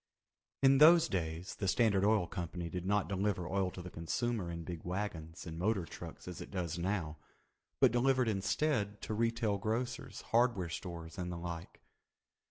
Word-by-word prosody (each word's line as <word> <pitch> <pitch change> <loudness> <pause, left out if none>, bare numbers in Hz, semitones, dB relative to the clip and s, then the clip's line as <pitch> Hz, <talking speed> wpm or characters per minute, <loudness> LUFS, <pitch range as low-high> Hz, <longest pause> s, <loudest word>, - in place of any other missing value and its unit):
In 135 0 +6
those 165 +2 +8
days 85 0 -3
the 100 - -3
Standard 100 -1 +3
Oil 105 -3 +4
Company 85 0 -4
did 90 +1 -4
not 105 0 +2
deliver 95 -2 -1
oil 95 -1 +1
to 90 -1 -8
the 90 - -8
consumer 100 +4 -2
in 85 0 -5
big 85 -1 -6
wagons 90 -3 -4
and 80 -1 -6
motor 95 -1 +1
trucks 85 0 -9
as 90 - -6
it - - -8
does 85 -3 -3
now, 85 -4 -1 0.6
but - - +6
delivered 125 +1 +3
instead 105 0 0
to - - -3
retail 115 -2 +1
grocers, 115 +5 -3
hardware 115 -7 +3
stores, 85 -1 -6
and 90 0 -3
the 85 - -4
like. 85 0 -6
95 Hz, 170 wpm, -34 LUFS, 85-110 Hz, 0.6 s, those